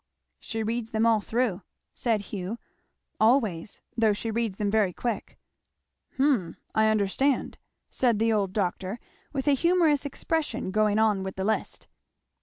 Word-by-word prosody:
"She 225 -1 -4
reads 225 +1 -2
them 220 0 +1
all 225 -2 +4
through," 225 -3 -1 0.3
said 225 -4 0
Hugh, 200 +2 -5 0.6
"always, 220 -6 +2
though 225 -2 +3
she 225 +2 -3
reads 225 -3 -1
them 205 -1 0
very 205 -4 +2
quick." 235 +2 -4 0.8
"Hum 260 - +1 0.2
I 220 0 +4
understand," 220 +6 +1 0.3
said 240 -4 +2
the 225 +1 +2
old 200 -3 +1
doctor 190 +2 -2 0.3
with 275 -1 -3
a 290 - +6
humorous 330 -1 +3
expression, 295 - -2
going 210 0 +2
on 215 -3 +3
with 190 0 -5
the 190 - -2
list. 220 +1 -2
220 Hz, 145 wpm, -27 LUFS, 200-245 Hz, 0.8 s, a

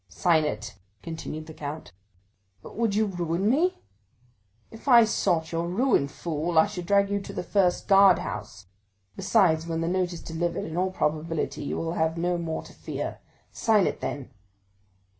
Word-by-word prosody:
"Sign 160 - +2
it!" 105 -5 -4 0.3
continued 160 -1 -6
the 160 - -10
count. 150 +1 -7 0.7
"But - - -11
would 225 -2 0
you 215 +1 +3
ruin 175 -1 -1
me?" 320 +10 +1 0.9
"If 225 +5 -13
I 240 -3 +8
sought 175 -6 0
your 165 0 -1
ruin, 205 - +2
fool, 160 +3 -3
I 160 - +7
should 185 -4 -6
drag 200 0 +3
you 200 0 0
to - - -8
the - - -4
first 180 0 +1
guard 195 -2 +7
house; - - -6 0.5
besides, 180 -5 +2
when 165 -1 -2
that 165 - -1
note 185 -1 0
is 170 - -8
delivered, 170 +1 -2
in 160 - -6
all 185 +2 +1
probability 155 -2 -2
you - - -3
will 165 0 -2
have 160 0 0
no 175 +1 0
more 165 -1 -3
to - - -14
fear. - - -5 0.3
Sign 215 -5 +3
it, - - -2
then!" 135 -1 -5
175 Hz, 175 wpm, -26 LUFS, 160-200 Hz, 0.9 s, I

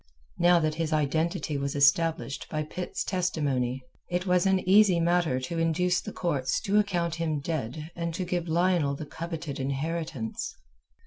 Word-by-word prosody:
Now 175 0 +6
that 155 -2 +1
his 160 0 -2
identity 155 +1 0
was 140 0 -2
established 145 +1 +2
by 155 -1 -2
Pitt's 180 +4 -4
testimony, 140 -9 -1 0.3
it 180 +1 -1
was 180 0 +3
an 190 -1 +1
easy 195 -2 +6
matter 170 -5 +2
to 165 +6 -3
induce 180 +3 +2
the 210 - -7
courts 140 -9 -1
to 205 +1 +2
account 175 -5 0
him 165 -3 -1
dead 155 +1 -4
and 170 -1 -2
to 185 - -2
give 175 -1 -2
Lionel 170 -4 +2
the 150 - -6
coveted 160 -2 -5
inheritance. 140 -2 -3
165 Hz, 155 wpm, -28 LUFS, 145-180 Hz, 0.3 s, Now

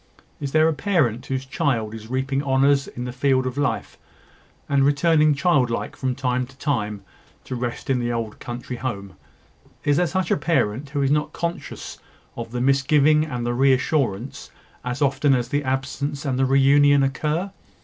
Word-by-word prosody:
Is 140 -2 -4
there 155 +1 +4
a 160 - +2
parent 145 - 0
whose 130 0 -3
child 130 -6 -1
is 110 0 -9
reaping 135 +2 -1
honours 140 0 +2
in 120 - -7
the 125 - -4
field 130 0 +1
of 130 0 -3
life, 145 0 -2 0.7
and 140 -1 +2
returning 150 +1 +3
childlike 140 -6 +1
from 130 -2 -2
time 125 -1 -1
to 135 +1 -19
time, 105 -9 -2 0.4
to - - -7
rest 120 -1 -4
in 130 -2 +1
the 120 0 -1
old 115 -2 -4
country 120 +1 -6
home 100 -7 -5 0.7
is 145 -1 +2
there 175 +1 +2
such 185 +1 -1
a - - +3
parent 145 -4 0
who 140 -1 -1
is 135 - +1
not 150 0 0
conscious 170 0 -5 0.4
of 115 -1 -6
the 120 +1 -3
misgiving 145 +3 +3
and 125 -5 -4
the 120 - 0
re 135 +2 +4
assurance, 130 -3 -1 0.3
as 125 +3 -2
often 140 0 +3
as 120 -1 -2
the 145 +1 0
absence 140 +2 -3
and 130 -2 -1
the 135 - +3
re 135 +1 +4
union 145 +1 +5
occur? 155 +7 -1
135 Hz, 180 wpm, -23 LUFS, 125-145 Hz, 0.7 s, union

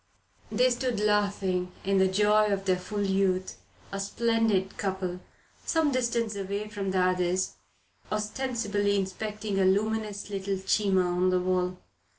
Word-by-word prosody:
They 250 +4 +3
stood 245 -2 -1
laughing 200 -3 +1
in 195 0 +2
the 190 - +5
joy 210 +2 +3
of 195 -1 -1
their 185 -1 +2
full 205 +3 -3
youth, 190 -1 0 0.3
a 195 - -3
splendid 215 -2 +1
couple, 185 -2 -3 0.4
some 320 -3 +2
distance 235 -4 0
away 200 +2 -3
from 200 -2 -3
the 190 - 0
others, 185 0 +1 0.5
ostensibly 210 -2 -1
inspecting 205 +1 -2
a - - +4
luminous 210 +1 0
little 195 0 -2
Cima 190 0 +2
on 180 +1 +1
the 185 0 +2
wall. 180 0 0
200 Hz, 140 wpm, -28 LUFS, 190-215 Hz, 0.5 s, the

